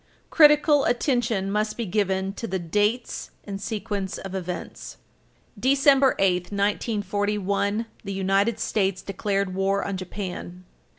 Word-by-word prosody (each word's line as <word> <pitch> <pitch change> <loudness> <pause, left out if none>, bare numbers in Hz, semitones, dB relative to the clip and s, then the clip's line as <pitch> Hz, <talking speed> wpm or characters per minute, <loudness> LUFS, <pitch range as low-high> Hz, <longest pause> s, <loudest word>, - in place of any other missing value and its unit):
Critical 300 -2 +6
attention 235 -5 0
must 215 +1 -1
be 235 - -2
given 195 -1 0
to 230 - -5
the 190 - -1
dates 210 +7 -1
and 195 -1 -6
sequence 205 -3 -3
of 195 -1 -7
events. 180 -2 -6 0.6
December 275 +1 +4
8, 180 -2 +2
1941, 205 +1 -1 0.2
the 200 - -5
United 195 +3 +1
States 195 -3 0
declared 195 -1 -2
war 195 +1 0
on 200 -1 -3
Japan. 185 -1 -6
200 Hz, 120 wpm, -25 LUFS, 190-225 Hz, 0.6 s, Critical